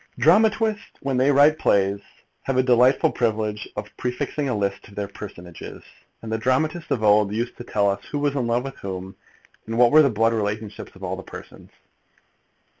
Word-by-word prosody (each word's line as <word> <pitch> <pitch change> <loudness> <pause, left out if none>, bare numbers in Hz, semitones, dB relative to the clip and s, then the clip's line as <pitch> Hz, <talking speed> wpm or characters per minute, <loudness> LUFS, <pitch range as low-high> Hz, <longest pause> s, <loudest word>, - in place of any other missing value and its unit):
Dramatists, 215 +4 +2
when 135 -2 -1
they 130 +3 +3
write 145 +2 +7
their 155 - -8
plays, 100 -4 +2 0.4
have 135 -1 -2
a 130 - +4
delightful 125 +1 +4
privilege 110 -2 -2
of 105 0 -7
prefixing 130 +3 -3
a 115 - -1
list 100 -1 -3
of 100 - -16
their 100 -1 -3
personages; 90 -4 -10 0.4
and 110 - -6
the 110 - -1
dramatists 155 +8 0
of 115 - -1
old 105 -1 +4
used 120 +3 -3
to - - -8
tell 105 -4 0
us 100 0 -1
who 145 - -4
was 145 -1 0
in 130 -4 -1
love 120 +1 0
with 135 0 -7
whom, 95 -1 -7 0.5
and 115 +1 -3
what 120 -1 +5
were 155 - +8
the 140 - +4
blood 115 0 +1
relationships 105 -1 -4
of 95 - -14
all 95 0 -3
the 95 - -8
persons. - - -12
115 Hz, 195 wpm, -23 LUFS, 105-135 Hz, 0.5 s, were